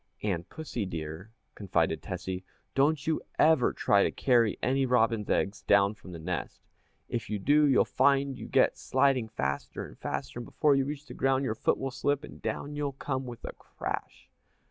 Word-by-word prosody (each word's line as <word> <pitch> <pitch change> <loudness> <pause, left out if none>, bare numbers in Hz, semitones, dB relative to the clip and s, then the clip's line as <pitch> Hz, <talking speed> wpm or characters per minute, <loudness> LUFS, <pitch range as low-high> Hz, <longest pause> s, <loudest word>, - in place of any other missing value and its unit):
"And, 90 -5 -2
Pussy 130 -10 -4
dear," 80 +3 -6 0.2
confided 100 -3 0
Tessie, 95 0 -5 0.3
"don't 145 +2 +2
you 160 -1 0 0.2
ever 155 -5 +5
try 100 - +3
to - - +3
carry 120 -5 +2
any 135 +2 +1
robin's 115 -4 +2
eggs 100 +1 0
down 100 0 +4
from 105 -4 -13
the 85 - -7
nest. 85 +2 -5 0.4
If 115 - -4
you 105 - -1
do, 145 +9 +4
you'll 135 - +4
find 140 -1 +2
you - - -8
get - - +3
sliding 130 -5 +2
faster 70 -8 -3
and - - -14
faster, - - -4
and 120 - -6
before 150 -2 +3
you 135 -1 +2
reach 145 +1 -5
the - - -10
ground 135 0 +1
your 130 - 0
foot 110 - +1
will 135 0 -3
slip 145 +2 0
and - - -11
down 145 +1 -3
you'll 145 -1 -2
come 130 -1 -3
with 120 -1 -8
a - - -6
crash!" - - -6
125 Hz, 190 wpm, -29 LUFS, 100-140 Hz, 0.4 s, ever